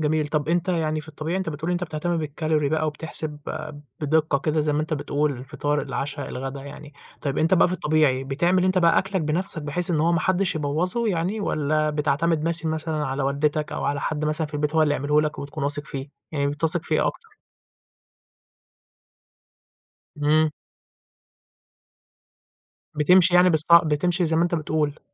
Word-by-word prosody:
جميل. 155 0 +1
طب 150 0 -1
أنتَ 175 +1 0
يعني 155 -3 0
في 155 - -12
الطبيعي 155 +3 -4
أنتَ 190 - -3
بتقول 160 +3 -4
أنتَ 175 0 -1
بتهتم 165 +2 -2
بالCalorie 155 -1 -1
بقى 155 0 +1
وبتحسب 155 0 -4 0.6
بدقة 155 -1 +1
كده 155 +1 0
زي 150 0 0
ما 150 - +1
أنتَ 155 0 -2
بتقول، 145 0 -1
الفطار، 145 +3 -2
العشا، 140 0 -4
الغدا 135 +1 -5
يعني. 145 +1 -10 0.3
طيب 140 -3 -2
أنتَ 165 +4 +3
بقى 180 - +4
في 180 - -1
الطبيعي 150 -5 +1
بتعمل 175 +7 +1
أنتَ 185 0 +2
بقى 170 -1 +4
أكلَك 190 -1 -1
بنفسَك 160 +1 +1
بحيث 170 +5 0
إن 160 -3 +1
هو 170 +2 +2
ما 165 - +2
حدش 185 0 +1
يبوظه 170 +10 -1
يعني 185 +4 -1
والّا 155 -4 0
بتعتمد 150 +2 0
مس 165 -1 0
مثلًا 155 -1 -2
على 135 +1 -2
والدتَك 145 +2 0
أو - - -3
على 140 0 -1
حد 155 -1 -2
مثلًا 155 +1 0
في 150 - -11
البيت 150 +1 -1
هو 160 - +4
اللي 150 -1 +2
يعمله 150 +2 +2
لَك 150 0 -3
وبتكون 140 +1 -5
واثق 145 +1 0
فيه، 135 +1 -6 0.2
يعني 140 -2 0
بتثق 155 +3 +1
في - - -1
إيه - - +2
أكتر؟ 450 -2 -5 2.9
امم. 155 +1 +3 2.4
بتمشي 180 +4 +5
يعني 180 0 +6
بالص 155 -1 +1
بتمشي 170 +2 +4
زي 160 0 +1
ما 165 - +3
أنتَ 175 0 0
بتقول. 155 -2 -1
155 Hz, 175 wpm, -24 LUFS, 145-165 Hz, 2.9 s, يعني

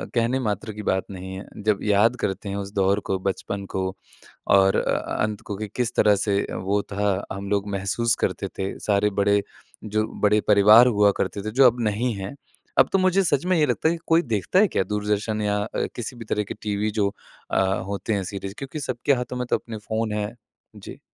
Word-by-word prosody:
कहने 120 +2 +2
मात्र 110 -2 -3
की 105 0 -7
बात 95 0 0
नहीं 95 0 -7
है। 95 - -8 0.2
जब 105 -2 +2
याद 105 +3 +3
करते 100 +1 -2
हैं 100 - -3
उस 100 0 -5
दौर 100 0 +2
को 95 - +1
बचपन 100 +1 -3
को 95 0 0 0.7
और 95 0 +4
अ - - 0 0.2
अंत 105 -1 -2
को 100 - -6
कि 110 +1 -4
किस 125 -2 -1
तरह 105 -1 +5
से 100 0 +1
वो 100 +2 0
था 100 -1 0
हम 100 0 -6
लोग 100 0 0
महसूस 100 +4 0
करते - - -1
थे 95 0 -3
सारे 105 0 +2
बड़े 100 0 +3 0.4
जो 110 +1 -1
बड़े 105 0 +4
परिवार 105 +4 +7
हुआ 105 -3 +4
करते 100 - -2
थे 110 - -3
जो 130 +3 +6
अब 120 0 +1
नहीं 115 +4 -1
है। 100 +7 -6 0.4
अब - - +6
तो 195 - +5
मुझे 185 +1 +3
सच 145 -4 +1
में 185 - +2
ये 155 - +4
लगता 160 - +1
है 170 - 0
कि - - -9
कोई 165 +1 +4
देखता 115 - +1
है 215 - +6
क्या - - +1
दूरदर्शन 105 +1 -1
या 105 0 0 0.4
किसी 120 +1 -5
भी 115 - -8
तरह 105 0 -1
के 100 - -6
टीवी 105 0 -1
अ, - - -4
जो 100 -2 +1 0.8
होते 100 +2 -2
हैं 100 -2 -1
सीरीज़ 95 +1 -6
क्योंकि 135 +3 -6
सबके 130 +1 0
हाथों 125 -1 -3
में 125 - -2
तो - - +3
अपने 115 -2 -8
फोन 110 -1 -1
हैं, 105 +2 -3 0.4
जी। - - -10
105 Hz, 215 wpm, -24 LUFS, 100-115 Hz, 0.8 s, परिवार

